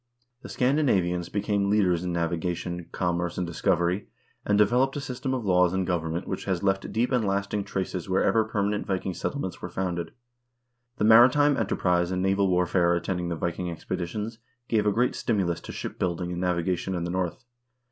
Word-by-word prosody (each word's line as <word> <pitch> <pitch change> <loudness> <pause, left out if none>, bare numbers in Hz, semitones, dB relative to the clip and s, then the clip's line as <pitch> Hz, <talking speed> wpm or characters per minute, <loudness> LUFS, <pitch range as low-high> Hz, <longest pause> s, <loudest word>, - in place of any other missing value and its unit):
The - - -10
Scandinavians 100 - +1
became 100 -1 0
leaders 90 -5 +2
in 90 - -2
navigation, 85 +1 -2
commerce, 90 -1 -1
and 90 - 0
discovery, 85 +2 0 0.4
and 105 - +2
developed 125 +6 +3
a - - -2
system 130 -1 -4
of 120 -4 -4
laws 90 -2 +3
and 95 -1 0
government 85 -1 -2
which 95 - -4
has 95 -1 -1
left 95 0 0
deep 120 +4 0
and 125 -3 +2
lasting 100 0 -1
traces 95 -2 -3
wherever 95 +4 +3
permanent 105 -1 -1
Viking 95 -1 -1
settle 140 - -3
ments 90 - -5
were 90 - -5
founded. 90 -2 -3 0.9
The - - -1
maritime 130 +6 +6
enterprise 90 -5 +1
and 90 0 -1
naval 95 +1 +2
warfare 90 -1 +2
attending 90 0 -2
the 85 - -2
Viking 85 +2 -3
expeditions 95 +6 -4 0.3
gave 105 -2 +1
a - - +4
great 120 +4 +1
stimulus 95 -7 -1
to - - -8
ship - - -6
building 90 0 -1
and 90 0 -3
navigation 90 +1 -1
in 85 - -2
the 85 - -3
North. 90 +7 -3
95 Hz, 175 wpm, -26 LUFS, 85-105 Hz, 0.9 s, maritime